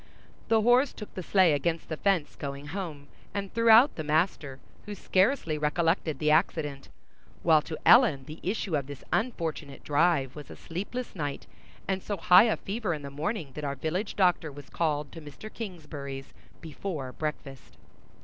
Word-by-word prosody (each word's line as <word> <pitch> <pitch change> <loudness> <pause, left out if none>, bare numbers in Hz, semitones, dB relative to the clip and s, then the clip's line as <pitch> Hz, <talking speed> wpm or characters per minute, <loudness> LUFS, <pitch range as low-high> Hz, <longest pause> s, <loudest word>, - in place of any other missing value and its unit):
The 225 -1 +3
horse 250 +4 +4
took 210 - -10
the 185 - -5
sleigh 185 -2 +4
against 160 +3 -1
the 160 - -3
fence, 180 -3 0
going 140 0 -6
home, 160 -5 -5 0.3
and 200 -1 -4
threw 230 0 +2
out 235 +6 +7
the 155 - -3
master, 155 -3 0 0.3
who 205 - -5
scarcely 185 - +1
recollected 160 0 0
the 150 +1 +1
accident; 150 -4 0 0.5
while 160 -2 +5
to 155 +1 -6
Ellen 220 - +6
the 155 +1 -9
issue 190 -3 -2
of 140 -3 -2
this 145 -1 -9
unfortunate 165 - -2
drive 145 -3 +2
was 150 -3 -10
a - - -9
sleepless 205 +9 -6
night 145 -5 -4 0.4
and 190 -1 -1
so 205 +1 -4
high 180 +4 +7
a 220 - +1
fever 200 -4 -3
in 150 - -9
the 140 - -7
morning 155 - -3
that 150 - -7
our 140 -1 -2
village 170 - -3
doctor 180 -5 +2
was 145 0 -12
called 150 -3 -1
to 165 - -10
Mr. 150 +9 -11
Kingsbury's 145 -10 -7 0.3
before 155 -4 -5
breakfast. 140 -2 -6
160 Hz, 170 wpm, -28 LUFS, 145-195 Hz, 0.5 s, out